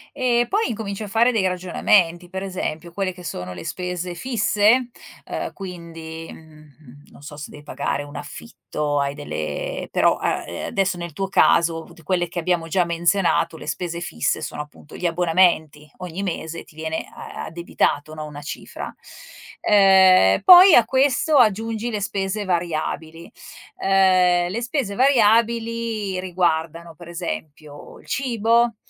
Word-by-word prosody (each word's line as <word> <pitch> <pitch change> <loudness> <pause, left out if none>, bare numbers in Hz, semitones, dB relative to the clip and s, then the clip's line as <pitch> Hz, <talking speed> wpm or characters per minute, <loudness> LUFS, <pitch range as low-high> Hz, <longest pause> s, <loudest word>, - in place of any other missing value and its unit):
E 240 -3 +2
poi 430 +3 +1
incominci 215 -2 -4
a - - -6
fare 230 +4 +3
dei 205 -5 +1
ragionamenti 180 -1 +1
per 190 +1 -5
esempio 175 -3 -5
quelle 190 +1 -2
che 180 0 -13
sono 90 - -5
le 85 - -9
spese 180 -1 -4
fisse, 230 +2 +2 0.4
uhm, - - -5
quindi, 165 -3 -8
mhmm, 150 -3 -16
non - - -16
so 145 0 -10
se 150 - -7
devi 145 - -12
pagare 145 - -3
un 145 0 -12
affitto, 145 -2 -4
hai 140 0 -1
delle - - -5
però, - - +3
a - - -2
ehm, - - -6
adesso 190 -2 0
nel 170 -2 -7
tuo 195 +5 -3
caso 165 -3 +3 0.2
quelle 175 +2 0
che 175 +1 -5
abbiamo 170 -1 -1
già 180 +2 +2
menzionato, 170 -1 +1
le - - -11
spese 170 +2 -3
fisse, 80 - -1
sono - - -5
appunto 150 0 -13
gli - - -5
abbonamenti. 165 -3 +1
Ogni 180 +1 -6
mese 165 -3 -4
ti - - -19
viene 160 0 -4
a - - -8
addebitato, 165 -2 -2
no, 155 -1 -6
una 145 -1 -9
cifra, 150 - -7 0.7
ehm, 190 - +5
poi 365 -1 +9
a 235 - +6
questo 275 +3 +2
aggiungi 225 0 +2
le 210 -2 -3
spese 195 +1 -2
variabili, 165 -2 -3 0.5
uhm, 185 -2 +3
le 225 +5 -3
spese 240 -4 -2
variabili 230 -4 +2
riguardano, 170 -2 -1
per 170 +3 -13
esempio, 155 -4 -7
il - - -19
cibo 235 -2 +1
180 Hz, 150 wpm, -22 LUFS, 160-210 Hz, 0.7 s, poi